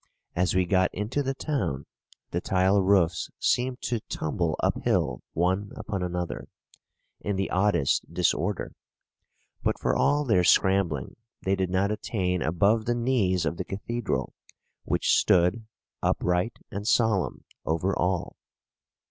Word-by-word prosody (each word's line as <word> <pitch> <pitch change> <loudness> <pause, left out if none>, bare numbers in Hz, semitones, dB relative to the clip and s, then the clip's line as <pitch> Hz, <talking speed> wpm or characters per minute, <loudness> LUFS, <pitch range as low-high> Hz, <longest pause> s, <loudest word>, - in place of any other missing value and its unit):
As 90 0 +1
we 95 -1 +3
got 95 0 +2
into 105 +9 -1
the 135 -1 -2
town, 130 - -2 0.5
the 85 - -1
tile 95 +2 +3
roofs 95 -3 +2
seemed 125 +1 0
to 120 -2 -1
tumble 80 +1 -1
uphill 60 - 0
one 95 +4 0
upon 100 -4 -4
another, 90 -1 -3 0.7
in 100 - -2
the 95 0 -2
oddest 95 -7 +1
disorder; - - 0 0.9
but - - 0
for - - +1
all 145 +1 +2
their 110 -8 +3
scrambling, 90 -6 +2 0.3
they 95 +1 +2
did 95 -2 -1
not 95 +3 +1
attain 95 -4 -1
above 100 +8 +2
the 120 - +1
knees 115 -8 +1
of 85 - -2
the - - -2
cathedral, 115 +3 -3 0.5
which - - +1
stood, 95 +5 +3 0.3
upright 90 +6 0
and 100 +2 -5
solemn, 110 -6 +2 0.2
over 85 +5 0
all. 90 -1 -1
95 Hz, 130 wpm, -27 LUFS, 90-110 Hz, 0.9 s, we